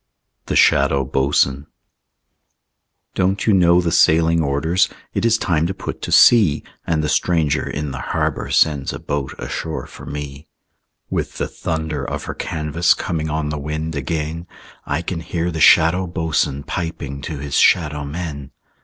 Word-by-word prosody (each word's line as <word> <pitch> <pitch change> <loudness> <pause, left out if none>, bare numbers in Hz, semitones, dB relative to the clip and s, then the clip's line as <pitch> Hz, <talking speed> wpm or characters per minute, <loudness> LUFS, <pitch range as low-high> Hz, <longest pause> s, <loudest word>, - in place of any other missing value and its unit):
THE - - -2
SHADOW 70 -1 +4
BOATSWAIN 70 0 +1 1.5
Don't 95 +1 0
you 110 - +4
know 90 -2 +5
the 85 -2 0
sailing 80 +1 +4
orders? 80 +6 +1 0.2
It - - -1
is 115 -1 +4
time 85 -6 0
to 95 - -4
put - - -6
to - - -5
sea, 105 -11 +5 0.2
And 80 -2 0
the - - 0
stranger 75 -5 +1
in 75 -1 -4
the 65 - -6
harbor - - -2
Sends 70 -4 +2
a - - -6
boat 70 -2 -4
ashore 80 -1 -5
for - - -12
me. 75 0 -7 0.6
With - - -3
the - - -2
thunder 80 -3 -4
of - - -4
her - - -5
canvas 80 +2 0
Coming 80 -3 -3
on 75 0 -2
the 75 0 -3
wind 75 +2 -4
again, 80 +4 -3 0.4
I 85 - -1
can 85 -1 -4
hear 85 +1 -3
the 80 -2 -4
Shadow 90 +6 +5
Boatswain 80 -4 -1
Piping 70 -5 -5
to 75 +1 -5
his 70 0 -6
shadow 75 -5 +3
men. 70 -2 -6
80 Hz, 160 wpm, -20 LUFS, 70-85 Hz, 1.5 s, know